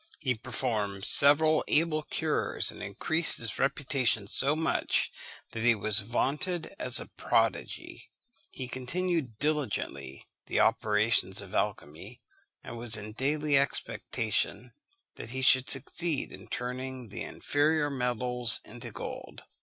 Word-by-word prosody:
He 130 -4 0
performed 110 -5 -4
several 155 +2 +5
able 155 0 +1
cures, - - -1
and - - -12
increased 160 +1 +4
his 115 -2 +2
reputation 130 -6 -1
so 135 +8 +4
much 160 +1 -1 0.4
that 115 - -6
he 120 0 +3
was 105 0 +3
vaunted 150 - -2
as 320 - +6
a - - -4
prodigy. - - -3 0.4
He 130 - -7
continued 135 - -3
diligently 105 - -4 0.2
the - - -1
operations 105 -2 +1
of 95 - -13
alchymy, 100 +2 -5 0.4
and 120 - -9
was 115 -2 +1
in 105 0 -8
daily 145 +4 0
expectation 120 -3 -2 0.4
that - - -8
he 130 +2 -4
should 130 0 +3
succeed 150 +3 +1
in - - -13
turning 125 -1 -6
the - - -7
inferior 145 0 -1
metals 125 -2 +2
into 120 +1 -8
gold. - - -9
125 Hz, 125 wpm, -28 LUFS, 110-145 Hz, 0.4 s, as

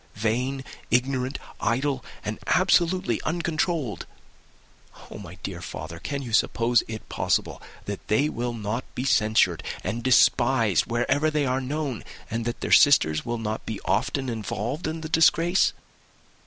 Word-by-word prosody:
Vain, 125 +6 -1 0.3
ignorant, 130 +1 +1 0.2
idle, 130 +3 0 0.2
and - - -4
absolutely 180 +2 +2
uncontrolled! 160 - -2 1.0
Oh, - - -8
my 90 -3 -10
dear 90 -3 -5
father, 85 -1 -7
can 140 +6 -4
you 120 -3 -7
suppose 115 +1 +3
it 110 -1 -7
possible - - -1 0.2
that - - -6
they 110 +8 +2
will 120 -4 -3
not 110 +2 -3
be 125 - -2
censured 110 - +3 0.2
and 115 +1 -3
despised 120 -5 +3
wherever 135 +6 +1
they 150 -2 0
are 130 0 0
known, 140 -2 -3 0.3
and 115 0 -2
that 120 0 -4
their - - -3
sisters 80 - +5
will 120 0 -1
not 110 -1 -4
be 110 -3 -4
often 135 +4 0
involved 115 - -3
in 160 +1 -4
the 155 - -5
disgrace?" 165 +3 +4
125 Hz, 140 wpm, -25 LUFS, 110-145 Hz, 1.0 s, sisters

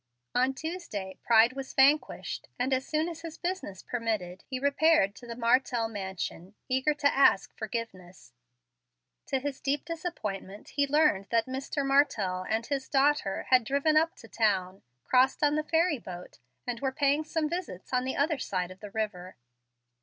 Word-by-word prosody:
On 260 +2 +2
Tuesday 315 - -5
pride 230 +1 +5
was 270 0 -7
vanquished, 280 +3 +2
and 255 +2 0
as 260 +1 0
soon 310 +1 0
as 330 -1 -7
his 330 -1 -8
business 350 - -4
permitted 215 -7 -3
he 260 - -3
repaired 285 -6 +3
to 240 +4 -13
the 235 - -6
Martell 235 0 +2
mansion, 190 -2 -5
eager 265 +3 +1
to 285 -1 +2
ask 235 -8 +4
forgiveness. 205 - -6 0.9
To 270 - +1
his 270 +1 -4
deep 280 +1 -1
disappointment, 215 - -5
he 285 0 +1
learned 290 -9 +3
that 230 -1 +2
Mr. 270 +2 -3
Martell 210 -10 +2
and 220 +1 0
his 275 -1 -3
daughter 275 -7 +2
had 255 -2 +6
driven 280 +6 +1
up 325 +2 +3
to 225 - -14
town, 195 -5 0 0.2
crossed 260 +3 +3
on 295 0 +4
the 305 - +1
ferry 320 -2 +2
boat, 180 -4 -10 0.3
and 240 -1 -3
were 265 0 -1
paying 285 +2 +2
some 315 0 -1
visits 330 - -5
on 250 0 +2
the 260 - -2
other 300 0 +1
side 180 -2 -2
of 185 - -12
the 210 - -8
river. 200 -4 -4
260 Hz, 170 wpm, -29 LUFS, 205-290 Hz, 0.9 s, had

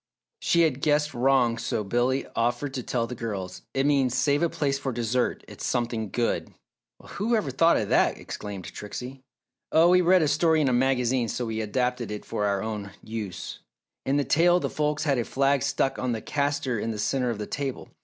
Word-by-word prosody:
She 170 - +3
had 145 -5 +2
guessed 150 0 +2
wrong 120 -2 +2
so 110 - -2
Billy 120 +6 0
offered 120 +4 0
to 130 - -3
tell 120 -1 -1
the 120 - -6
girls. 100 -6 -5
"It 135 +1 +2
means, 135 -4 +2
'Save 145 +3 +2
a 170 - +2
place 140 -3 -1
for 135 -1 -2
dessert 120 +1 -1
it's - - -10
something 115 -3 -1
good!'" 120 +4 -1 0.5
"Well, - - -16
who 225 +4 0
ever 170 -12 -1
thought 165 +6 +4
of 105 - -2
that!" - - +3
exclaimed 100 -3 -7
Trixie. 125 +6 -7 0.5
"Oh, 165 +2 +6
we 180 0 +6
read 180 0 +5
a - - +2
story 160 +2 +3
in 145 -3 +2
a - - +1
magazine 125 -1 +2
so 120 +2 -3
we 110 -1 -3
adapted 125 +2 -1
it 105 0 -6
for 105 - -2
our 100 -1 0
own 105 -2 -4
use. 110 -5 -6 0.4
In 135 +2 +1
the 145 - +2
tale 175 +5 +4
the - - -3
folks 150 0 0
had 140 -5 +1
a - - +1
flag 135 +2 +1
stuck 135 0 0
on 125 -2 -1
the 110 - -4
caster 140 -5 -1
in 115 - -2
the 110 - -3
centre 125 +4 0
of 115 - -2
the 105 - -4
table. 135 +1 -4
130 Hz, 210 wpm, -26 LUFS, 115-145 Hz, 0.5 s, Oh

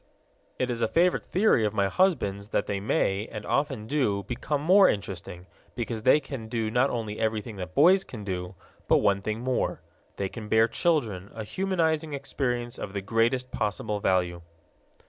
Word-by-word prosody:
It 125 -1 -1
is 120 -1 -3
a 115 - +3
favorite 175 +8 +2
theory 190 - +3
of 105 0 -1
my 100 -1 +2
husband's 100 - +1
that - - 0
they 100 -1 -2
may, 100 0 0
and 105 -1 -6
often 135 -6 -1
do, 110 -7 0
become 125 +7 -2
more 185 +6 +6
interesting, 90 -3 -5 0.3
because 115 -2 -3
they 130 +6 +5
can 130 -7 -7
do 110 -2 -2
not 125 +4 +3
only 110 -3 -4
everything 110 -1 -2
that 90 -1 -7
boys 190 +2 +6
can 110 - -9
do 90 -1 -4 0.3
but - - +5
one 100 -1 +2
thing 110 +3 -3
more 130 0 -1 0.4
they 100 - -2
can 105 +2 -8
bear 110 +1 +5
children, 115 - 0
a 110 - -4
humanizing 160 - 0
experience 125 -3 -3
of 95 - -6
the 100 - -2
greatest 115 +5 0
possible 105 0 -2
value. 90 -3 0
110 Hz, 175 wpm, -27 LUFS, 100-135 Hz, 0.4 s, more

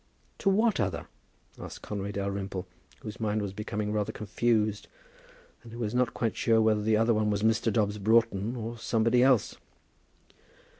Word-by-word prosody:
"To 195 - +2
what 215 - +2
other?" 95 -6 -1 0.5
asked - - -9
Conway 100 -1 -4
Dalrymple, 100 -1 -3 0.4
whose 105 +2 -8
mind 110 -1 0
was 100 -2 -4
becoming 105 0 -3
rather 105 -1 -1
confused, 105 0 0 0.7
and 115 - -13
who 115 - -9
was 110 -2 -3
not 125 -1 +1
quite 115 -2 -1
sure 115 -1 +3
whether 110 -1 +3
the 110 +1 +2
other 115 +1 +3
one 105 -1 +1
was 105 0 -1
Mr. 110 0 +2
Dobbs 105 -1 0
Broughton, 110 +1 +2
or 115 0 -5
somebody 115 +2 +2
else. 130 -4 +3
110 Hz, 160 wpm, -28 LUFS, 105-115 Hz, 0.7 s, sure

